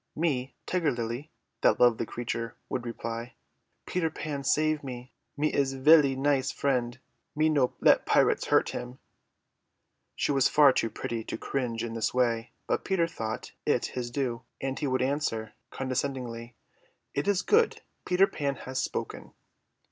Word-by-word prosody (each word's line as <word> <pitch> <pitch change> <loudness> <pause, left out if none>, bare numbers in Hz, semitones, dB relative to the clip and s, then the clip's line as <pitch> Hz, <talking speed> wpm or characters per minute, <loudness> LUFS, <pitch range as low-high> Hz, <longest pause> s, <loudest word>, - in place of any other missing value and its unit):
"Me 140 -5 -1
Tiger 175 -4 +1
Lily," 120 +3 -4 0.3
that - - +4
lovely 120 -2 +4
creature 115 -1 -4
would 125 -2 -3
reply. 115 +1 -5 0.5
"Peter 175 -3 0
Pan 150 -2 -5
save 155 +2 +2
me, 125 -1 -8 0.2
me 150 +1 +1
his 135 -1 +1
velly 140 0 +6
nice 135 0 +1
friend. 125 -2 -1 0.4
Me 155 +1 +3
no 140 -5 +2
let - - +5
pirates - - +3
hurt - - +3
him." 125 +1 -6 1.2
She - - 0
was 135 -2 +4
far 145 -3 +6
too 115 - 0
pretty 115 +1 -4
to - - -4
cringe 120 -4 -2
in 115 -1 -4
this 115 +2 -1
way, 120 -2 +1 0.2
but - - -1
Peter 190 -4 +2
thought 110 -9 -5
it - - +1
his 125 -1 -3
due, 120 -2 -2 0.2
and 135 0 -3
he 145 - -1
would 130 -1 +1
answer 130 -6 -1 0.2
condescendingly, 125 -3 -3 0.6
"It 140 +5 -1
is 195 -2 +2
good. 455 +2 +3 0.2
Peter 180 +2 +4
Pan 140 -7 -2
has 130 0 -4
spoken." - - -5
130 Hz, 155 wpm, -28 LUFS, 120-145 Hz, 1.2 s, velly